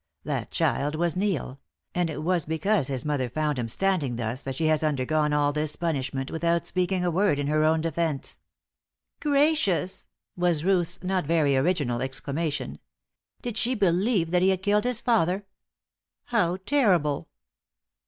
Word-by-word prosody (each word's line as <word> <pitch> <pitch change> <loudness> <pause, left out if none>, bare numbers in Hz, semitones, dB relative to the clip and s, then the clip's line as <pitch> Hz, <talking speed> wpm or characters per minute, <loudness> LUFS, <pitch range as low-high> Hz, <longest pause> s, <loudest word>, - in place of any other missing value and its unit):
That - - -3
child 145 +2 0
was 170 0 0
Neil; 180 -9 -1 0.3
and 175 -2 0
it 150 -1 -5
was 175 -1 +1
because 160 +1 +1
his 135 -1 -3
mother 140 -4 -1
found 150 +1 -1
him 120 - -2
standing 160 -2 0
thus 115 +2 -3
that 135 -1 -5
she 160 - -1
has 155 0 +2
undergone 150 +1 +1
all 145 -1 +2
this 150 0 -1
punishment 135 -5 -2
without 170 +1 0
speaking 180 0 0
a 175 - +1
word 190 -2 +2
in 145 - -1
her 155 +1 +2
own 160 +1 +3
defence." 165 -3 -2 0.8
"Gracious!" 285 - +1 0.3
was 175 -3 +1
Ruth's 180 -1 +1
not 185 -4 -1
very 155 -4 +3
original 135 -4 +1
exclamation. 140 +4 -3 0.6
"Did 240 -3 -4
she 250 +2 +1
believe 190 -2 +2
that 180 0 +3
he 190 - +4
had 190 -1 0
killed 210 +1 +2
his 250 -2 0
father? 200 -4 +1 0.8
How 185 -7 +1
terrible!" 185 - +2
165 Hz, 155 wpm, -26 LUFS, 145-185 Hz, 0.8 s, he